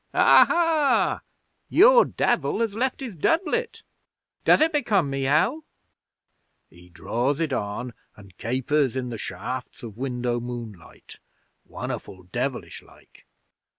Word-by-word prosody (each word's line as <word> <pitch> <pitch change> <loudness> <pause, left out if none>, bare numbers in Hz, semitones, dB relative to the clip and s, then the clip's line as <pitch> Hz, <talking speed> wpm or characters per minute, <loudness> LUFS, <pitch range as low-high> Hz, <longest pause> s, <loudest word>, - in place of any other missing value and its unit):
'"Aha! 330 -4 +4 0.5
Your 485 +6 +6
Devil - - 0
has 225 -3 0
left 255 +5 -2
his 240 -7 -6
doublet! 380 - -1 0.6
Does - - +5
it 320 +1 +2
become 210 - +1
me, 135 0 -2
Hal?" 185 - +1 1.1
He 90 +2 -18
draws 120 - -2
it 160 -4 -1
on 115 +3 -4 0.2
and 100 -3 -16
capers 130 +3 0
in 130 -1 -3
the 115 -3 -6
shafts 125 +3 -6
of 110 -3 -9
window 125 -2 -2
moonlight 115 -7 -9 0.5
won'erful 95 -1 -7
devilish - - -4
like. - - -22
135 Hz, 120 wpm, -24 LUFS, -, 1.1 s, Your